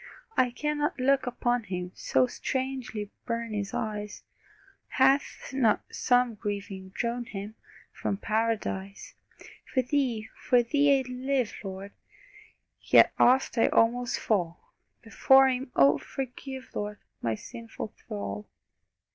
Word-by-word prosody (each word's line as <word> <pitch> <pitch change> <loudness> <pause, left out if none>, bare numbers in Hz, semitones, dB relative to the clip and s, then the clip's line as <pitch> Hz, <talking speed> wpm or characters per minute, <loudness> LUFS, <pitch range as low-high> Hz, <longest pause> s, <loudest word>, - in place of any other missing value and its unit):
I 255 -1 +3
cannot 295 +3 -2
look 270 0 +2
upon 245 -1 0
Him, 180 -2 -4
So 130 -1 +2
strangely 255 - -4 0.2
burn 230 -1 -2
His 200 -1 -3
eyes 210 -1 -4 0.6
Hath 270 +1 +1
not 240 -6 +2
some 245 -1 +2
grieving 200 -2 -5
drawn 240 0 -2
Him 205 -2 -7 0.4
From 200 - -2
Paradise? 210 -3 -2 0.6
For 260 -3 +2
Thee, 250 -5 0
for 245 -1 +3
Thee 285 +3 +4
I'd 265 -1 -3
live, 255 -1 -1
Lord! 195 0 -7 0.9
Yet - - +5
oft 255 -1 +4
I - - +5
almost 245 +2 +2
fall 175 -6 -2 0.3
Before 265 +4 +5
Him 255 0 -2
Oh, 140 +1 +5
forgive, 265 0 -7
Lord, 210 0 -4 0.2
My 115 -1 0
sinful 230 - -8
thrall! 100 0 -6
235 Hz, 120 wpm, -28 LUFS, 205-260 Hz, 0.9 s, Yet